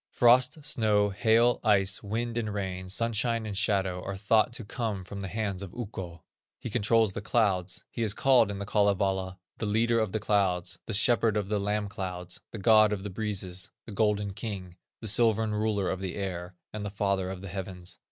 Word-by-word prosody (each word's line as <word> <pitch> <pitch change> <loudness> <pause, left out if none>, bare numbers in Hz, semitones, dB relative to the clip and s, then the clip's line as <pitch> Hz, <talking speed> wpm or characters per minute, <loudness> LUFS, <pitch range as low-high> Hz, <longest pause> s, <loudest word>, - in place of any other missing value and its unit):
Frost, 125 +5 +4
snow, 105 -5 +2
hail, 115 +4 +3
ice, 95 -3 +2
wind 115 +3 -3
and 110 -3 -2
rain, 95 -2 -4
sunshine 115 +2 0
and 105 -2 -5
shadow, 95 -4 +1
are 95 0 -5
thought 110 +3 +3
to 120 -2 -4
come 105 -3 -3
from 100 +2 -7
the 95 - -4
hands 100 -1 -3
of 95 -3 -8
Ukko. 95 -8 -7 0.3
He 120 - -7
controls 110 -2 +2
the - - -4
clouds; 100 -5 0
he 115 - -5
is 110 -2 +1
called 130 -5 +4
in 100 - -4
The 100 - -4
Kalevala, 95 -2 +1 0.2
"The 110 - -2
Leader 115 +2 +2
of 110 -3 0
the 110 - -1
Clouds," 95 -4 0
"The 115 - 0
Shepherd 115 -1 +3
of 100 -2 -2
the 105 -1 0
Lamb 105 +1 -1
Clouds," 90 -3 -5
"The - - -7
God 110 0 +5
of 95 -2 -4
the 100 - -5
Breezes," 95 -3 -3 0.2
"The 115 - -9
Golden 105 -1 0
King," 95 -4 -6 0.3
"The 110 - -2
Silvern 110 0 +4
Ruler 105 -2 0
of 95 - -3
the 95 -2 -4
Air," 90 -2 -5 0.2
and 105 -1 -5
"The 100 - -3
Father 100 -2 -1
of 95 -1 -6
the 100 - -7
Heavens." 90 -1 -6
105 Hz, 200 wpm, -28 LUFS, 95-110 Hz, 0.3 s, God